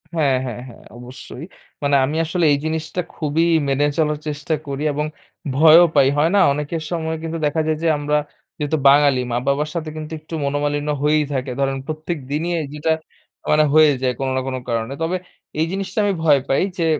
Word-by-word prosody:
হ্যাঁ, 140 Hz, -5 st, +2 dB
হ্যাঁ, 120 Hz, -1 st, -5 dB
হ্যাঁ, 120 Hz, -, -14 dB
অবশ্যই। 125 Hz, +4 st, -10 dB, 0.4 s
মানে 140 Hz, 0 st, +2 dB
আমি 145 Hz, +4 st, -3 dB
আসলে 170 Hz, +1 st, 0 dB
এই -, -, +2 dB
জিনিসটা 160 Hz, +3 st, -2 dB
খুবই 155 Hz, +1 st, 0 dB, 0.3 s
মেনে 140 Hz, +2 st, +2 dB
চলার 150 Hz, -2 st, +1 dB
চেষ্টা 150 Hz, +2 st, -3 dB
করি 140 Hz, +1 st, -4 dB
এবং 150 Hz, +1 st, -1 dB, 0.5 s
ভয়ও 160 Hz, +4 st, +8 dB
পাই। 140 Hz, -2 st, +5 dB
হয় 155 Hz, +3 st, +3 dB
না? -, -, +5 dB
অনেকের 150 Hz, +3 st, -3 dB
সময় 160 Hz, -2 st, -2 dB
কিন্তু 165 Hz, 0 st, -3 dB
দেখা 160 Hz, +2 st, +1 dB
যায় 155 Hz, -1 st, 0 dB
যে, -, -, +2 dB
আমরা 150 Hz, +1 st, 0 dB, 0.4 s
যেহেতু 150 Hz, +1 st, -1 dB
বাঙালি, 140 Hz, -2 st, +5 dB
মা-বাবার 140 Hz, +5 st, 0 dB
সাথে 160 Hz, -2 st, -3 dB
কিন্তু 155 Hz, 0 st, -7 dB
একটু 155 Hz, +2 st, -13 dB
মনোমালিন্য 145 Hz, +1 st, -1 dB
হয়েই 150 Hz, +1 st, +3 dB
থাকে। 130 Hz, -1 st, -2 dB
ধরেন, 135 Hz, 0 st, 0 dB
প্রত্যেক 155 Hz, +2 st, -4 dB
দিনই 165 Hz, +4 st, -1 dB, 0.2 s
যেটা 150 Hz, +2 st, -1 dB, 0.6 s
মানে 155 Hz, 0 st, +5 dB
হয়ে 155 Hz, -1 st, +6 dB
যায় 125 Hz, -1 st, +1 dB
কোনো 135 Hz, -1 st, -1 dB
না -, -, 0 dB
কোনো 130 Hz, -1 st, -3 dB
কারণে। 115 Hz, +2 st, -2 dB
তবে 170 Hz, +3 st, 0 dB, 0.4 s
এই 160 Hz, -, +3 dB
জিনিসটা 195 Hz, +2 st, -5 dB
আমি 205 Hz, -1 st, +1 dB
ভয় 145 Hz, -3 st, +5 dB
পাই। 135 Hz, -, +2 dB, 0.2 s
যে, 170 Hz, -, 0 dB
150 Hz, 185 wpm, -20 LUFS, 140-160 Hz, 0.6 s, ভয়ও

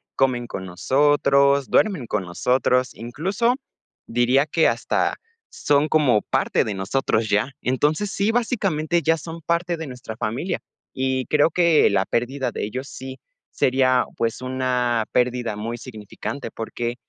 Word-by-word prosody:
Comen 125 Hz, -3 st, +1 dB
con 95 Hz, -, -6 dB
nosotros, 140 Hz, -, +3 dB
duermen 185 Hz, -, +2 dB
con 105 Hz, -3 st, -1 dB
nosotros, 125 Hz, +7 st, +1 dB
incluso, 190 Hz, -, -1 dB, 0.5 s
diría 120 Hz, +4 st, +3 dB
que 160 Hz, +1 st, +2 dB
hasta -, -, 0 dB, 0.4 s
son 145 Hz, +1 st, +2 dB
como 135 Hz, -9 st, +3 dB
parte -, -, +1 dB
de 105 Hz, -, -3 dB
nosotros 110 Hz, +2 st, -1 dB
ya. 105 Hz, +7 st, +1 dB
Entonces, 150 Hz, +10 st, 0 dB
sí, 205 Hz, +3 st, +1 dB
básicamente, 190 Hz, -9 st, 0 dB
ya 165 Hz, 0 st, +2 dB
son 165 Hz, +2 st, -8 dB
parte 170 Hz, +1 st, -1 dB
de 160 Hz, -2 st, -6 dB
nuestra 125 Hz, -3 st, -8 dB
familia 120 Hz, -, -2 dB, 0.3 s
y 130 Hz, -1 st, -1 dB
creo 150 Hz, +2 st, +3 dB
que 170 Hz, -2 st, +4 dB
la 100 Hz, -1 st, +1 dB
pérdida 130 Hz, +3 st, -1 dB
de -, -, -4 dB
ellos 130 Hz, +6 st, -5 dB
sí 130 Hz, 0 st, -8 dB, 0.3 s
sería, 130 Hz, -1 st, +2 dB
pues, 115 Hz, +1 st, -1 dB
una 125 Hz, -3 st, 0 dB
pérdida 125 Hz, -3 st, 0 dB
muy 115 Hz, +3 st, -4 dB
significante, 115 Hz, +2 st, -7 dB
porque 120 Hz, +1 st, -4 dB
130 Hz, 140 wpm, -22 LUFS, 120-155 Hz, 0.5 s, que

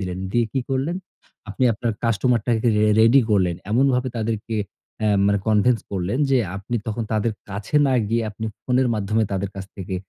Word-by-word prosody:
দিলেন। 90 Hz, -1 st, -4 dB
দিয়ে 120 Hz, -1 st, +3 dB
কি 135 Hz, -, 0 dB
করলেন? 135 Hz, +6 st, -1 dB, 0.5 s
আপনি 105 Hz, +6 st, -1 dB
আপনার 115 Hz, +2 st, -2 dB
কাস্টমারটাকে 115 Hz, 0 st, +1 dB
রে 105 Hz, -, +3 dB, 0.2 s
রেডি 115 Hz, +5 st, +6 dB
করলেন। 95 Hz, -4 st, +2 dB, 0.2 s
এমনভাবে 130 Hz, +2 st, +2 dB
তাদেরকে 110 Hz, 0 st, -2 dB, 0.4 s
অ্যা 110 Hz, -1 st, +2 dB, 0.2 s
মানে 100 Hz, 0 st, +3 dB
কনভিন্স 110 Hz, +3 st, +3 dB
করলেন 95 Hz, +5 st, -2 dB
যে 135 Hz, -, +4 dB, 0.2 s
আপনি 105 Hz, +5 st, -3 dB
তখন 110 Hz, +1 st, -2 dB
তাদের 110 Hz, +1 st, +1 dB, 0.2 s
কাছে 100 Hz, +8 st, -2 dB
না 135 Hz, -, +2 dB, 0.2 s
গিয়ে 115 Hz, +1 st, +1 dB
আপনি 110 Hz, +2 st, -7 dB, 0.2 s
ফোনের 125 Hz, 0 st, +2 dB
মাধ্যমে 110 Hz, +1 st, 0 dB
তাদের 100 Hz, 0 st, -2 dB
কাছ 95 Hz, 0 st, -6 dB
থেকে 95 Hz, -1 st, -5 dB
110 Hz, 175 wpm, -22 LUFS, 100-125 Hz, 0.5 s, রেডি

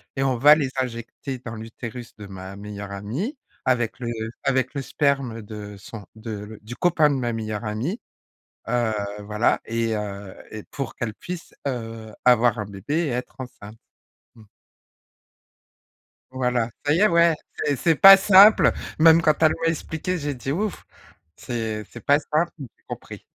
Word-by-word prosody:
et 135 Hz, -, 0 dB
on 130 Hz, -2 st, +1 dB
va 150 Hz, +5 st, +8 dB
les 145 Hz, -4 st, -1 dB
injecter 125 Hz, +1 st, -5 dB
dans 120 Hz, -2 st, -7 dB
l'utérus 115 Hz, +2 st, -8 dB
de 105 Hz, -, -10 dB
ma 95 Hz, 0 st, -9 dB
meilleure 100 Hz, 0 st, -8 dB
amie 130 Hz, -, -4 dB, 0.3 s
avec 120 Hz, -3 st, 0 dB
le 120 Hz, -, -4 dB, 0.4 s
avec 130 Hz, -1 st, +1 dB
le 140 Hz, -, -3 dB
sperme 135 Hz, -5 st, 0 dB
de 105 Hz, -1 st, -8 dB
son 100 Hz, +1 st, -10 dB
de 110 Hz, +1 st, -7 dB
le 105 Hz, +1 st, -7 dB
du 110 Hz, +3 st, -8 dB
copain 165 Hz, -4 st, +3 dB
de 145 Hz, -, 0 dB
ma 120 Hz, -3 st, -1 dB
meilleure 110 Hz, -1 st, -4 dB
amie, 120 Hz, -, -3 dB, 0.7 s
heu, 120 Hz, -2 st, +1 dB, 0.3 s
voilà 105 Hz, +2 st, +1 dB
et 115 Hz, 0 st, -1 dB
heu, 100 Hz, -2 st, -5 dB, 0.2 s
et 110 Hz, -1 st, -7 dB
pour 135 Hz, -4 st, -6 dB
qu'elle 115 Hz, -3 st, -3 dB
puisse, 175 Hz, +8 st, -8 dB
heu, 115 Hz, -4 st, -5 dB
avoir 120 Hz, -2 st, +5 dB
un 105 Hz, -, -3 dB
bébé 100 Hz, +8 st, -5 dB
et -, -, -2 dB
être 125 Hz, 0 st, -4 dB
enceinte. 110 Hz, -4 st, -10 dB, 0.6 s
Mmh. 115 Hz, -, -16 dB, 1.9 s
Voilà, 125 Hz, -3 st, 0 dB, 0.2 s
ça 145 Hz, -, +3 dB
y 165 Hz, -, +2 dB
est, 210 Hz, -, +6 dB
ouais 170 Hz, -1 st, +4 dB, 0.3 s
c'est 145 Hz, -, +2 dB
c'est 160 Hz, +6 st, +2 dB
pas 195 Hz, +6 st, +11 dB
simple! 195 Hz, +2 st, +7 dB, 0.3 s
Même 165 Hz, +1 st, +7 dB
quand 155 Hz, -2 st, +4 dB
elle 155 Hz, -, +6 dB
m'a 165 Hz, -, +1 dB
expliqué, 165 Hz, +2 st, -3 dB
j'ai 145 Hz, -2 st, -3 dB
dit: 135 Hz, +1 st, -5 dB
«Ouf! 205 Hz, +4 st, -3 dB, 0.5 s
C'est 110 Hz, -3 st, -4 dB
c'est -, -, -11 dB
pas 145 Hz, +1 st, +5 dB
simple 155 Hz, +3 st, 0 dB
mais 140 Hz, -, -7 dB
j'ai -, -, -37 dB
compris». -, -, -9 dB
120 Hz, 170 wpm, -24 LUFS, 110-145 Hz, 1.9 s, pas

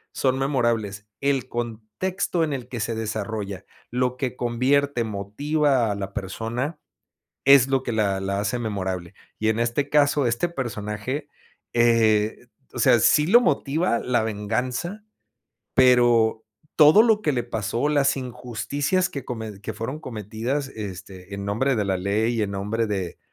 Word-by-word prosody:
son 130 Hz, -1 st, +1 dB
memorables. 115 Hz, -7 st, -1 dB
El 140 Hz, -2 st, +1 dB
contexto 120 Hz, -, -2 dB
en 150 Hz, -, -1 dB
el 125 Hz, -3 st, -5 dB
que 125 Hz, -2 st, -6 dB
se 115 Hz, +2 st, -1 dB
desarrolla, 105 Hz, -3 st, -4 dB, 0.2 s
lo 125 Hz, +1 st, 0 dB
que 130 Hz, -2 st, -2 dB
convierte, 125 Hz, +2 st, +1 dB
motiva 125 Hz, +5 st, 0 dB
a -, -, -2 dB
la 100 Hz, -1 st, -5 dB
persona, 115 Hz, -, -4 dB, 0.7 s
es 140 Hz, -2 st, +7 dB
lo 135 Hz, -1 st, +1 dB
que 120 Hz, -, -3 dB
la 100 Hz, -3 st, +1 dB
la 100 Hz, +1 st, -1 dB
hace 105 Hz, +4 st, -1 dB
memorable, 95 Hz, -6 st, -4 dB, 0.2 s
y 110 Hz, -, 0 dB
en 110 Hz, 0 st, +1 dB
este 120 Hz, +5 st, 0 dB
caso 145 Hz, -2 st, +3 dB
este 120 Hz, +9 st, 0 dB
personaje, 125 Hz, 0 st, -4 dB, 0.4 s
eh, 115 Hz, -1 st, +3 dB, 0.3 s
o -, -, -7 dB
sea, 120 Hz, -1 st, +5 dB
sí 150 Hz, +7 st, +4 dB
lo 230 Hz, +8 st, +7 dB
motiva 145 Hz, -, +1 dB
la 120 Hz, -2 st, +1 dB
venganza, 125 Hz, -, -3 dB, 0.7 s
pero 120 Hz, -3 st, +4 dB, 0.3 s
todo 155 Hz, +7 st, +8 dB
lo 220 Hz, -2 st, +3 dB
que 150 Hz, -, +1 dB
le 120 Hz, -3 st, -1 dB
pasó, 115 Hz, +3 st, -1 dB
las 145 Hz, -2 st, +2 dB
injusticias 135 Hz, +8 st, -2 dB
que 140 Hz, -7 st, -6 dB
comen 110 Hz, -4 st, -6 dB
que -, -, -5 dB
fueron 130 Hz, +7 st, -5 dB
cometidas 120 Hz, +3 st, -3 dB
este, 95 Hz, -3 st, -8 dB
en 100 Hz, 0 st, -5 dB
nombre 120 Hz, +7 st, 0 dB
de 105 Hz, -, 0 dB
la 95 Hz, -1 st, 0 dB
ley 105 Hz, +5 st, 0 dB
y 115 Hz, -, 0 dB
en 100 Hz, -, -2 dB
nombre 105 Hz, +3 st, -1 dB
de 95 Hz, -4 st, -3 dB
120 Hz, 155 wpm, -24 LUFS, 105-135 Hz, 0.7 s, todo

